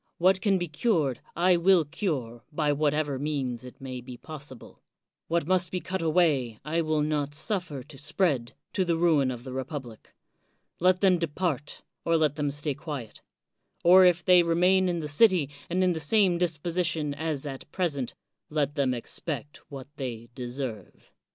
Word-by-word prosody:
What 185 +2 +3
can 200 -3 +3
be 175 -1 -2
cured, 155 - 0 0.2
I 180 +1 +4
will 175 -1 +4
cure, 140 - -3
by 150 -1 +1
whatever 150 -1 0
means 135 -5 -2
it 125 - -12
may 130 -2 -6
be 125 0 -9
possible. 145 -4 -10 0.5
What 170 -2 0
must 180 0 +2
be 185 - -2
cut 185 +1 -4
away, 155 -9 +2
I 165 +2 0
will 155 -2 +1
not 145 -1 -1
suffer 155 - -3
to 135 - -13
spread, 145 -5 0 0.2
to 190 - +2
the 170 -2 0
ruin 160 -6 +3
of 120 -2 -5
the 130 -1 -7
republic. 130 -4 -7 0.6
Let 185 +1 +3
them 185 -3 +4
depart, 160 -3 -2 0.2
or 165 0 +3
let 155 -3 +2
them 150 -2 -1
stay 145 +1 -2
quiet; 135 -6 -7 0.6
or 185 +2 +8
if 175 -2 +4
they 180 -1 +7
remain 180 +3 +3
in 170 -2 -1
the 150 - -4
city 155 -1 +3 0.2
and 185 +2 +1
in 180 -1 +3
the 160 - -3
same 180 +2 +2
disposition 170 -2 -1
as 150 -1 -3
at 135 0 -7
present, 145 -9 -2 0.3
let 145 -2 0
them 135 -4 +1
expect 145 +3 -5
what 135 -3 -8
they 120 -4 -5
deserve. 125 -5 -6
155 Hz, 170 wpm, -27 LUFS, 135-175 Hz, 0.6 s, or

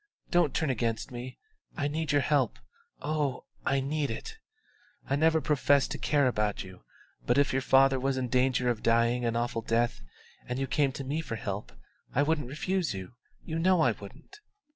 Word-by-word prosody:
Don't 175 -6 +3
turn 155 -4 +1
against 115 -1 -2
me; 125 +1 -7 0.4
I 145 -3 0
need 155 0 -2
your 145 -1 +3
help 135 -3 +1 0.5
oh, 145 -3 -1 0.2
I 140 0 +3
need 145 +1 -1
it! 115 - -6 0.7
I 135 - +1
never 160 +2 +3
professed 145 -2 +2
to - - -4
care 145 -2 +2
about 105 -5 0
you; 95 -1 -12 0.5
but 120 - +3
if 140 -1 +3
your 135 - +1
father 135 0 +4
was 135 +1 0
in 130 -1 -1
danger 125 0 +2
of 120 -3 0
dying 115 +1 +2
an 115 0 0
awful 120 -1 -1
death 115 - 0 0.5
and 125 - -3
you 135 - 0
came 135 +1 +1
to 135 - -5
me 145 +4 -2
for 115 - -5
help, 100 -2 -5 0.4
I 140 - +4
wouldn't 150 -3 0
refuse 175 - -1
you, 95 +2 -7 0.3
you 160 -1 -3
know 180 0 +4
I 125 - +4
wouldn't." 105 - -12
135 Hz, 185 wpm, -29 LUFS, 120-150 Hz, 0.7 s, father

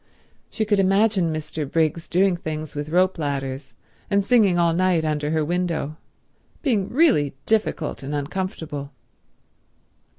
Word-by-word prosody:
She 220 - -2
could 205 -1 +2
imagine 195 -2 +3
Mr. 155 -2 -4
Briggs 165 0 0
doing 185 +1 +3
things 155 -3 -5
with 145 +1 -4
rope 180 +2 +2
ladders, 135 -3 -4 0.3
and 200 -1 +2
singing 205 -6 +4
all 170 -1 +3
night 180 -2 +2
under 150 -1 -1
her 155 -1 +1
window—being 180 - -3
really 240 - +3
difficult 215 -8 0
and 140 +2 -4
uncomfortable. 145 -2 -4
165 Hz, 125 wpm, -23 LUFS, 150-195 Hz, 0.3 s, singing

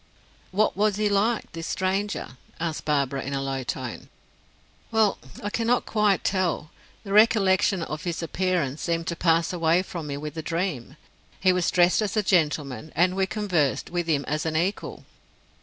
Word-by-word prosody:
"What 210 +3 +1
was 210 +1 +2
he 210 0 +1
like, 210 +3 +1
this 165 0 -6
stranger?" 195 +2 -1 0.3
asked 165 -2 -3
Barbara, 140 -2 0
in 140 - -5
a 135 - -1
low 135 -1 -2
tone. 125 -1 -5 0.8
"Well, 220 -3 +2 0.2
I 205 - -2
cannot 235 +2 +1
quite 210 -3 +2
tell. 185 -5 0 0.3
The 200 -2 -5
recollection 200 -4 +4
of 155 +1 -5
his 170 -2 -3
appearance 170 -5 -1
seemed 165 -1 -1
to 170 - -2
pass 165 +1 +2
away 170 +1 +2
from 175 -6 -6
me 140 -1 -4
with 150 0 -6
the 160 - -4
dream. 165 -5 -3 0.4
He 185 -1 +4
was 180 -1 +1
dressed 180 +3 +4
as 215 +1 -2
a 215 - +3
gentleman, 155 -5 0
and 180 +2 +3
we 190 0 +1
conversed, 180 -12 0
with 175 -1 -1
him 145 -3 +1
as 150 +1 -1
an 160 -1 -2
equal." 180 +6 -2
175 Hz, 175 wpm, -25 LUFS, 155-195 Hz, 0.8 s, recollection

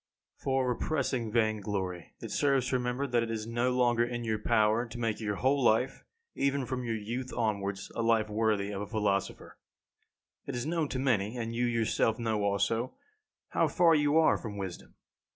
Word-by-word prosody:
1. - - -24
For 135 -1 +1
repressing 125 -3 -1
vain 110 -2 +1
glory, 95 -4 -4
it - - -6
serves 135 -3 +2
to 130 - +2
remember 125 +2 -1
that 120 -3 +1
it 115 - -2
is 110 -1 -3
no 120 +2 0
longer 120 -2 +3
in 120 0 -3
your 110 -2 -1
power 110 +2 +2
to 115 +1 -8
make 115 -3 -1
your 105 -2 -2
whole 135 +5 +2
life, 120 +3 +2 0.3
even 140 -1 0
from 125 0 -3
your 115 -1 -1
youth 120 +4 -4
onwards, 100 -4 -2
a - - -2
life 115 -1 +3
worthy 105 -2 0
of 100 -1 -4
a 105 - -4
philosopher. 105 -3 -2 0.9
It - - -3
is 120 - -2
known 160 -2 0
to - - -3
many, 120 -4 0
and 115 -1 -3
you 120 +1 +1
yourself 115 -1 +1
know 110 -3 -1
also, 100 +5 0 0.5
how - - +2
far 170 -2 +4
you 150 0 +3
are 160 - +5
from 105 -3 -6
wisdom. 95 -3 -7
115 Hz, 190 wpm, -30 LUFS, 105-125 Hz, 0.9 s, are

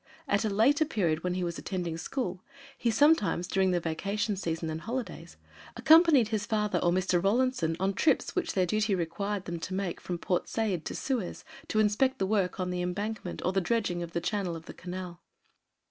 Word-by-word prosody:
At 200 0 +2
a 215 - +1
later 240 +10 +4
period, 175 - 0
when 180 0 -1
he 185 - -1
was 170 -1 -3
attending 175 -4 -3
school, 185 - -3 0.3
he 245 -3 0
sometimes, 225 - +3
during 190 -1 +2
the 180 -1 +2
vacation 200 +6 -2
season 165 -3 -3
and 160 +1 -5
holidays, 245 +4 -5 0.4
accompanied 315 -8 +6
his 215 -1 -2
father 210 -5 +1
or 175 - +2
Mr. 180 -1 +1
Rawlinson 200 -6 +1
on 195 +1 +1
trips, 315 - +1
which 365 - -1
their 185 -2 +2
duty 215 +2 +1
required 190 +3 -3
them 170 -1 -4
to 185 +3 -4
make 190 -3 -3
from 175 - -4
Port 180 +1 -1
Said 200 -8 -1
to - - -4
Suez 250 -9 -3 0.2
to - - -2
inspect 215 +5 +2
the 190 - 0
work 195 -2 0
on 180 -1 -1
the 180 0 -2
embankment 190 +2 -4
or 185 - +1
the 195 - +2
dredging 200 -4 0
of 170 -1 -6
the 170 - -1
channel 190 -2 -1
of 165 0 -9
the - - -9
Canal. 180 -1 -7
190 Hz, 200 wpm, -29 LUFS, 175-220 Hz, 0.4 s, accompanied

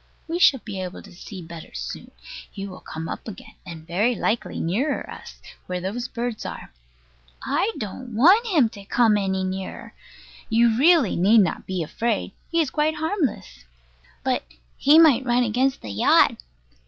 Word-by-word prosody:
We 335 +1 -2
shall 285 -9 +5
be 195 -3 -6
able 180 -1 -7
to - - -14
see 185 +1 -9
better 165 0 -10
soon. - - -6 0.4
He 195 - -7
will 185 -1 -10
come 160 +1 -7
up - - -7
again, 220 +2 -10
and 165 -2 -9
very 205 +9 +1
likely 225 +1 -2
nearer 240 - -1
us, - - -11 0.3
where 180 0 -3
those 215 +7 -4
birds 240 -2 -4
are. - - -8 0.7
I 430 - 0
don't 225 +3 -7
want 375 - +5
him 315 - +4
to 200 -2 -12
come 225 0 +3
any 190 -2 0
nearer. 185 0 -5 0.6
You 230 0 +3
really 300 - +4
need 210 +6 +5
not 185 - -2
be 185 -3 -2
afraid. 225 +6 -2 0.2
He 335 - 0
is 310 -5 +1
quite 310 +1 +1
harmless. 300 - -3 0.6
But - - 0 0.3
he 295 +3 +5
might 295 -6 +6
run 245 -1 +2
against 255 +4 0
the 105 - -7
yacht. 100 - +4
225 Hz, 165 wpm, -23 LUFS, 185-265 Hz, 0.7 s, might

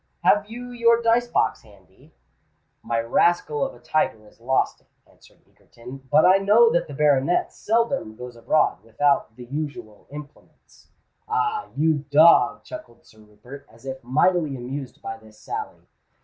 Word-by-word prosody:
"Have 205 0 +3
you 245 +2 -8
your 235 -1 +3
dice 235 +1 +2
box - - 0
handy?" 100 -4 -22 0.7
"My 115 -1 -2
rascal 150 +5 +1
of - - -4
a - - -17
tiger 115 -5 -1
has 105 - -22
lost 130 +3 0
it," - - -35 0.2
answered - - -24
Egerton. 125 +3 -13
"But 150 +3 +5
I 185 +1 +6
know 215 +4 +4
that 170 - 0
the 145 - -9
baronet 145 +2 +1
seldom 230 - -1
goes 125 +1 -10
abroad 120 0 +1
without 115 +1 0
the 125 - -11
usual 120 -6 -7
implements." 145 0 -14 0.4
"Ah! 435 0 -1
you 155 0 +2
dog!" 155 +4 +5
chuckled 315 0 -11
Sir 110 - -21
Rupert, 110 +6 -14
as 115 +3 -19
if 130 0 -7
mightily 150 +4 +1
amused 130 +2 -7
by 115 - -6
this 110 -1 -19
sally. - - -7
145 Hz, 155 wpm, -23 LUFS, 120-195 Hz, 0.7 s, I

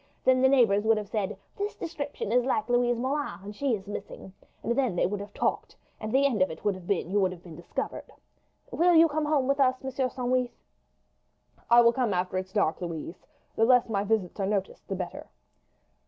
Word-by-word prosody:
Then 255 0 +4
the 265 - +5
neighbours 225 -7 +4
would 220 0 +3
have 210 -2 -5
said, 210 -4 -2 0.2
'This 410 0 -3
description 290 - -5
is 245 +1 +3
like 225 -4 0
Louise 245 0 +2
Moulin, 280 +4 -2
and 205 +1 -8
she 270 0 0
is 195 -2 -9
missing;' 200 -2 -8 0.3
and 235 - 0
then 255 -8 +1
they - - +2
would 200 +3 -2
have 205 +1 -8
talked, - - -2 0.2
and 215 - -5
the 270 +3 +3
end 240 -8 +1
of 185 - +4
it 160 - -9
would 205 - +3
have 185 -2 -11
been 190 -3 -1
you 205 - +2
would 190 -2 +2
have 180 -1 -11
been 170 -3 -11
discovered. 170 - -5 0.6
Will 345 +1 +3
you 330 +1 +7
come 305 0 -1
home 295 -4 +1
with 275 +1 +1
us, 260 -1 +2
Monsieur 265 -1 -1
Sandwith?" 250 0 0 1.2
"I 240 0 +8
will 235 0 +5
come 235 -6 0
after 185 +1 -1
it's 185 0 -7
dark, 195 -4 0
Louise. 170 0 -6 0.3
The 225 - +2
less 250 0 +4
my 200 -2 0
visits 205 -3 -1
are 195 - 0
noticed 200 -2 -3
the 195 - -3
better." 180 -1 -6
225 Hz, 215 wpm, -28 LUFS, 195-260 Hz, 1.2 s, I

